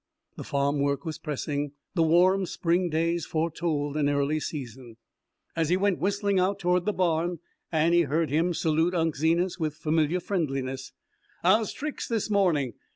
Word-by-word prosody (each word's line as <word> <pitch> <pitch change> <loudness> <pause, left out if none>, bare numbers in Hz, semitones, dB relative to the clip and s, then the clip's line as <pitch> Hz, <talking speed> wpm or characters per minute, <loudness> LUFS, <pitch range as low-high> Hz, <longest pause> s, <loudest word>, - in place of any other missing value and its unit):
The - - -7
farm 140 +1 0
work 140 0 0
was 160 -1 -4
pressing; 145 -1 -3 0.2
the 175 - +1
warm 180 +4 +4
spring 175 +1 0
days 165 +1 0
foretold 155 -2 -1
an 145 -1 +2
early 145 +2 +1
season. 125 -6 -7 0.6
As 165 -2 0
he 180 - +3
went 200 -1 +1
whistling 200 +1 +1
out 190 +2 +1
toward 180 -1 +1
the 210 - +2
barn 175 -1 0 0.3
Annie 170 +1 +3
heard 160 0 0
him 165 +3 +1
salute 160 +3 +1
Unc' 165 -2 +1
Zenas 170 +5 +1
with 155 -2 -2
familiar 155 +2 +1
friendliness: 135 -8 -3 0.5
"How's 210 +5 +3
tricks 300 +1 -5
this 225 -2 -1
morning? 165 - +2
165 Hz, 160 wpm, -27 LUFS, 150-180 Hz, 0.6 s, warm